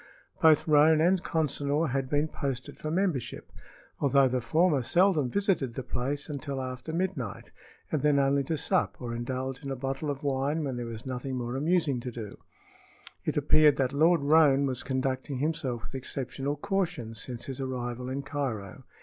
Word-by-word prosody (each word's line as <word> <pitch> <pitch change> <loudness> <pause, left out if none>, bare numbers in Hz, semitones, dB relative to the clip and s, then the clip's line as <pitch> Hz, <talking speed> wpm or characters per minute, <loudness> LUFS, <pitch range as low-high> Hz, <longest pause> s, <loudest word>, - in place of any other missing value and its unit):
Both 155 -1 +5
Roane 155 +1 +6
and 180 +3 +3
Consinor 150 0 0
had 135 -1 -1
been 145 +2 +1
posted 135 -4 -5
for 155 - -4
membership, 170 - -2 0.5
although 140 -1 +4
the 125 0 -1
former 155 +4 +2
seldom 170 - +3
visited 180 - 0
the 130 - -4
place 140 +4 -3
until 140 -2 -4
after 130 +3 -5
midnight, 165 - -3 0.4
and 155 - 0
then 150 -1 +3
only 140 0 +3
to 160 +3 -1
sup 185 +5 +1
or 120 -2 -5
indulge 130 +3 -4
in 140 - -5
a 135 - -2
bottle 135 +3 -3
of 140 +1 -4
wine 140 +3 0
when 135 -3 -2
there 120 -1 -4
was 115 +1 -7
nothing 130 +1 -4
more 120 0 -3
amusing 155 -2 +1
to 125 - -5
do. 110 -4 -8 0.9
It - - -1
appeared 150 0 +5
that 135 0 0
Lord 165 +3 +4
Roane 145 -2 +5
was 130 -2 0
conducting 130 +1 -2
himself 130 -5 -1
with - - -9
exceptional 135 +1 -3
caution 170 - -2
since 115 +2 -3
his 135 0 -5
arrival 125 -1 -4
in 135 +2 -3
Cairo. 130 - -4
140 Hz, 175 wpm, -28 LUFS, 130-155 Hz, 0.9 s, Roane